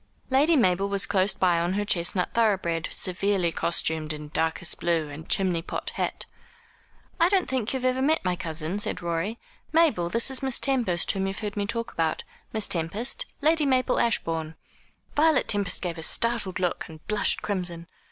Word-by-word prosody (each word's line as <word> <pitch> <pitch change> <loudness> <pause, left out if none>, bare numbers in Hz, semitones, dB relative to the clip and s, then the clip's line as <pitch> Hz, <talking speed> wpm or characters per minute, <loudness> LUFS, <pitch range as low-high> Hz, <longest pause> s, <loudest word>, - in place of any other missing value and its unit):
Lady 295 +5 +4
Mabel 195 -6 +2
was 200 -1 +2
close 190 0 +1
by 175 -2 +2
on 175 +2 0
her 205 +1 -1
chestnut 180 -1 +1
thoroughbred, 190 -8 +1
severely 185 -1 0
costumed 160 -2 -1
in 150 0 -8
darkest 160 +2 -1
blue 165 -3 0
and 150 +2 -10
chimney 185 -4 +1
pot - - -5
hat. - - -3 0.9
"I 335 +1 +5
don't 385 -2 +2
think 255 -4 -1
you've 260 -1 -3
ever 255 0 +1
met 305 -4 +1
my 180 -1 +1
cousin?" 165 +3 -4
said 205 - -2
Rorie. 170 +6 -2 0.3
"Mabel, 300 - +3
this 230 +6 +4
is 265 - +3
Miss 265 -2 +1
Tempest, 235 -11 +2
whom 195 0 -2
you've 195 +1 -4
heard 210 -1 -4
me 205 -1 -1
talk 230 +2 -2
about. 160 -1 -1 0.3
Miss 220 -2 -1
Tempest, 195 +10 -2
Lady 310 0 +3
Mabel 255 -1 +2
Ashbourne." 165 -8 0 0.6
Violet 315 +1 +3
Tempest 200 -4 0
gave 170 -2 -3
a - - -5
startled 225 +1 +1
look, 180 -2 -1
and 155 -1 -13
blushed 210 -1 +2
crimson. 175 -4 -3
195 Hz, 175 wpm, -26 LUFS, 170-235 Hz, 0.9 s, I